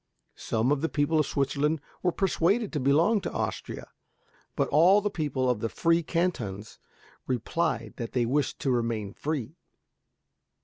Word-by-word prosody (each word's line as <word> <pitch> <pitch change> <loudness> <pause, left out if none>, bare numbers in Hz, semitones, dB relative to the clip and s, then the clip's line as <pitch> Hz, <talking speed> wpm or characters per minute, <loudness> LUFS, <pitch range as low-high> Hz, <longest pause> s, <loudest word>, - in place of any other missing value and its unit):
Some 115 +4 -1
of 145 -2 +1
the 165 - 0
people 145 +2 +1
of 150 - +2
Switzerland 145 +3 0 0.2
were 180 - +2
persuaded 195 +4 +1
to 150 - 0
belong 160 - +3
to - - -4
Austria, - - -4 0.6
but - - +1
all 180 +7 +6
the 205 0 -2
people 145 -7 -1
of 125 -3 +1
the 115 - -2
free 165 +5 +2
cantons 120 - -2 0.5
replied 130 +1 -1
that 115 -1 -5
they 125 -2 +2
wished 140 +5 0
to 135 - +1
remain 115 -4 -1
free. 150 0 -4
145 Hz, 150 wpm, -27 LUFS, 125-170 Hz, 0.6 s, all